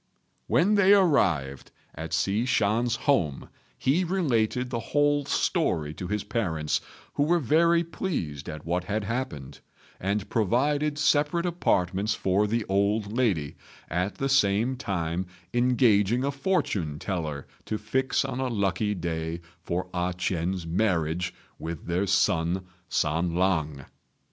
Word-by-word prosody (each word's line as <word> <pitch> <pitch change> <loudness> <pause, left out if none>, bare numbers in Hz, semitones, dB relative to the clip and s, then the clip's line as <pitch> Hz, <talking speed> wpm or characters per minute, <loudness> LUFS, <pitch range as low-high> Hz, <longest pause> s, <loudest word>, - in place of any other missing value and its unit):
When 190 +5 +3
they 200 -1 +6
arrived 85 - +2 0.2
at 80 +1 -7
Hsi 100 +7 +1
Shan's 115 +1 +2
home 85 - +1 0.3
he 150 +8 +2
related 125 - 0
the 120 - -1
whole 145 +4 +1
story 90 - 0
to 90 +4 -6
his 105 +1 -2
parents, 80 -10 -1 0.3
who - - -1
were 165 +4 +3
very 170 +4 +3
pleased 135 - -4
at 75 -1 -7
what 90 +2 -1
had 105 +2 -1
happened, 105 - -4 0.4
and 100 +1 -1
provided 145 +7 +1
separate 150 +3 +2
apartments 100 - +1
for 100 +3 +1
the 115 0 -1
old 100 +2 0
lady, 95 - 0 0.3
at 90 +4 -1
the 135 - -1
same 120 -1 +2
time 90 -6 -2 0.3
engaging 120 -2 +3
a 140 - 0
fortune 120 - -1
teller 80 -6 -4 0.2
to 110 - -2
fix 130 +6 0
on 130 -1 -4
a 130 - 0
lucky 105 -2 0
day 80 -1 -3 0.2
for 85 +2 -3
A 90 0 -1
ch'ien's 90 0 -1
marriage 90 -1 0 0.3
with 80 0 -6
their 90 +3 0
son 90 -1 +1 0.2
San 80 +2 0
lang. 80 -7 0
100 Hz, 135 wpm, -27 LUFS, 85-130 Hz, 0.4 s, they